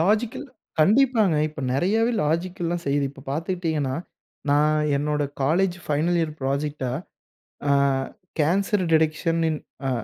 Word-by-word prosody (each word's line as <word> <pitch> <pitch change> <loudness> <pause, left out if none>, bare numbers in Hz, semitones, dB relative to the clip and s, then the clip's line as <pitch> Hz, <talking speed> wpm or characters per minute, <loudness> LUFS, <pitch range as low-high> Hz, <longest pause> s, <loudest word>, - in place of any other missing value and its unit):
Logical 215 - +1 0.3
கண்டிப்பாங்க. 220 - +4
இப்ப 155 -1 -9
நிறையாவே 220 - +2
லாஜிக்கல்லாம் 170 +2 -1
செய்யுது. 140 0 +1
இப்ப 135 -1 -14
பாத்துக்கிட்டீங்கன்னா, 160 -3 -1 0.5
நான் 150 +1 +3 0.2
என்னோட 150 +1 0 0.2
காலேஜ் 175 +6 +2
ஃபைனல் 155 +4 +1
இயர் 160 -2 -1
ப்ராஜெக்ட்ட, 140 +1 -2 0.8
அ - - +5 0.7
கேன்சர் 190 +5 +2
டிடெக்ஷனின் 160 0 +1 0.3
அ - - +1
160 Hz, 110 wpm, -24 LUFS, 150-185 Hz, 0.8 s, அ